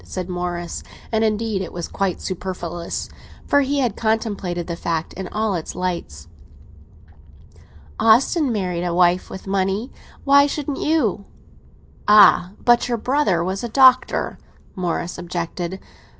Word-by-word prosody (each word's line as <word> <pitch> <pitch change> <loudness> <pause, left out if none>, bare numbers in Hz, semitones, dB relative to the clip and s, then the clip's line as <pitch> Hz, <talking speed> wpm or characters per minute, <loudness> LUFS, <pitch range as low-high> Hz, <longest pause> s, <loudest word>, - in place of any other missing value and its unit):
said 185 -2 -5
Morris; 175 -1 -4 0.3
and, 220 -1 +1
indeed, 215 -2 0
it 185 - -5
was 175 -1 -5
quite 195 -3 -2
superfluous, 175 -2 -5 0.4
for 285 - +3
he 280 +1 0
had 240 -5 0
contemplated 205 -6 -1
the 170 - -4
fact 165 -1 -3
in 190 0 -6
all 215 +1 -1
its 170 -3 -4
lights. 170 - -4 1.7
"Austin 255 +6 +4
married 180 -5 -2
a 175 -1 -1
wife 180 0 +3
with 190 - -9
money—why 205 +8 +1
shouldn't 290 -1 -4
you?" 235 - 0 0.8
"Ah! 200 -3 +6
but 240 0 +4
your 240 -1 -1
brother 230 - +1
was 190 +4 -3
a 240 - -3
doctor," 255 +1 +4 0.4
Morris 175 -1 -3
objected. 175 +1 -4
190 Hz, 130 wpm, -21 LUFS, 175-230 Hz, 1.7 s, Ah